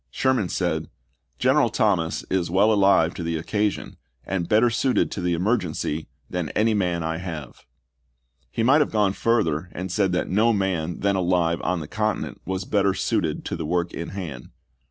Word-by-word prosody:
Sherman 125 Hz, -, +1 dB
said, -, -, -1 dB, 0.2 s
" 65 Hz, -1 st, -47 dB
General 130 Hz, -, +3 dB
Thomas 95 Hz, -7 st, 0 dB
is 90 Hz, -3 st, 0 dB
well 100 Hz, +5 st, +4 dB
alive 95 Hz, -5 st, +4 dB
to -, -, -6 dB
the 85 Hz, -1 st, -2 dB
occasion, 105 Hz, +5 st, -2 dB, 0.3 s
and 90 Hz, -3 st, -2 dB
better 115 Hz, +3 st, +4 dB
suited 125 Hz, +3 st, +1 dB
to 100 Hz, -, -4 dB
the 90 Hz, -1 st, +1 dB
emergency 85 Hz, -5 st, -1 dB, 0.2 s
than 90 Hz, -4 st, -3 dB
any 110 Hz, +1 st, +3 dB
man 90 Hz, -5 st, 0 dB
I 80 Hz, 0 st, -2 dB
have." 80 Hz, -9 st, -7 dB, 0.8 s
He 115 Hz, -, -2 dB
might 140 Hz, +6 st, +5 dB
have 150 Hz, -, +1 dB
gone 105 Hz, -3 st, +2 dB
further 90 Hz, -8 st, 0 dB
and 90 Hz, +1 st, -5 dB
said 95 Hz, 0 st, +1 dB
that 90 Hz, -, 0 dB
no 110 Hz, +5 st, +3 dB
man 90 Hz, -5 st, -1 dB
then 100 Hz, -1 st, +2 dB
alive 90 Hz, -2 st, +1 dB
on 90 Hz, -2 st, -1 dB
the 75 Hz, -, -7 dB
continent 110 Hz, +3 st, -2 dB
was 95 Hz, +1 st, -3 dB
better 100 Hz, -2 st, +2 dB
suited -, -, -1 dB
to -, -, -3 dB
the -, -, -4 dB
work 85 Hz, +1 st, -1 dB
in 85 Hz, -, -5 dB
hand. 80 Hz, -10 st, -7 dB
95 Hz, 180 wpm, -24 LUFS, 85-105 Hz, 0.8 s, might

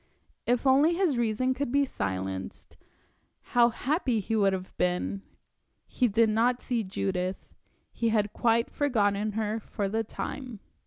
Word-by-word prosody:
If 245 Hz, +2 st, +1 dB
only 285 Hz, +6 st, +5 dB
his 350 Hz, -6 st, +2 dB
reason 240 Hz, +2 st, +1 dB
could 265 Hz, -1 st, -3 dB
be 280 Hz, +1 st, +3 dB
silenced, 95 Hz, -, -5 dB, 0.6 s
how 240 Hz, -1 st, +3 dB
happy 260 Hz, -, 0 dB
he 220 Hz, +3 st, -2 dB
would 200 Hz, -2 st, +3 dB
have 185 Hz, -1 st, -5 dB
been! 180 Hz, +2 st, -1 dB, 0.6 s
He 250 Hz, -, +1 dB
did 230 Hz, +1 st, +3 dB
not 240 Hz, +3 st, +2 dB
see 240 Hz, -3 st, -1 dB
Judith; 185 Hz, -1 st, -3 dB, 0.5 s
he 230 Hz, -, 0 dB
had 210 Hz, -2 st, +1 dB
quite 230 Hz, 0 st, +2 dB
forgotten 210 Hz, -6 st, +1 dB
her 220 Hz, +1 st, -1 dB
for 205 Hz, -1 st, -3 dB
the 220 Hz, +3 st, -1 dB
time. 245 Hz, +1 st, -6 dB
225 Hz, 145 wpm, -28 LUFS, 200-250 Hz, 0.6 s, only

